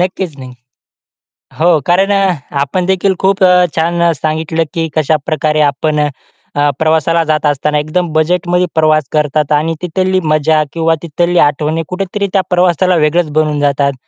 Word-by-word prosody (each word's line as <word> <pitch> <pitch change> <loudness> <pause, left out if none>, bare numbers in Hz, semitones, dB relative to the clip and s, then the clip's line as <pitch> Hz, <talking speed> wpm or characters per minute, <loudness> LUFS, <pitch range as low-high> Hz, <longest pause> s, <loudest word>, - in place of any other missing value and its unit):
नक्कीच 180 -4 -2
नाही. 130 -1 -9 1.1
हो, 165 -1 +3
कारण 190 +3 +2
अ, 195 -2 +2 0.3
आपणदेखील 185 +5 0
खूप 195 0 +1
अ, 180 -1 +5
छान 170 +1 +1
सांगितलं 160 +2 -2
की 165 -1 -1
कशाप्रकारे 155 0 0
आपण 150 +2 -1
अ, 145 0 -3
प्रवासाला 160 +1 +1
जात 155 -1 -1
असताना 150 +1 0
एकदम 155 +3 -2
बजेटमध्ये 175 +3 +1
प्रवास 155 -1 +3
करतात. 150 -1 0
आणि 155 +2 +1
तिथली 185 +2 0
मजा 155 0 +2
किंवा 165 -1 +1
तिथल्या 170 +1 +1
आठवणी 155 +3 -2
कुठेतरी 195 +2 -3
त्या 195 - +3
प्रवासाला 180 0 +2
वेगळंच 160 +1 +1
बनवून 150 -1 0
जातात. 140 -1 +1
160 Hz, 140 wpm, -13 LUFS, 150-180 Hz, 1.1 s, अ